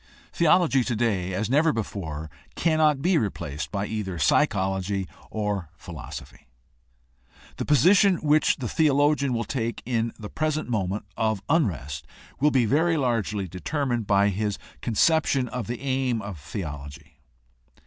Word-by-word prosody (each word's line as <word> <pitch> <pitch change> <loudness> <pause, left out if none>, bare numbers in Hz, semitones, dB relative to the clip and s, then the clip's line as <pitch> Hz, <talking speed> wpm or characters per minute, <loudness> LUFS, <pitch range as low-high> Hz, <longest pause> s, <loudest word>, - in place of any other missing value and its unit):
Theology 165 -5 +4
today 110 -7 0
as 100 +4 -1
never 150 +6 +3
before 80 - -5 0.2
cannot 155 -4 +2
be 180 -1 +3
replaced 75 - -4
by 100 -1 -2
either 105 -5 -4
psychology 95 - +1 0.2
or 105 -6 -2
philosophy. 80 -7 -9 1.1
The - - -3
position 185 - +5
which 155 -1 +3
the 125 - -4
theologian 145 -1 +2
will 115 -1 0
take 115 -3 -3
in 115 -1 0
the 105 - -7
present 155 +5 -2
moment 100 -3 -2
of 110 -3 0
unrest 75 - 0 0.3
will 150 +3 +4
be 130 -4 +3
very 160 +7 +2
largely 110 -7 0
determined 120 - -2
by 100 0 +4
his 105 +1 -2 0.2
conception 135 +2 +2
of 125 -4 -5
the 120 0 -4
aim 130 -3 0
of 90 -9 -8
the 100 - -3
ology. 70 -2 -9
115 Hz, 135 wpm, -25 LUFS, 95-145 Hz, 1.1 s, position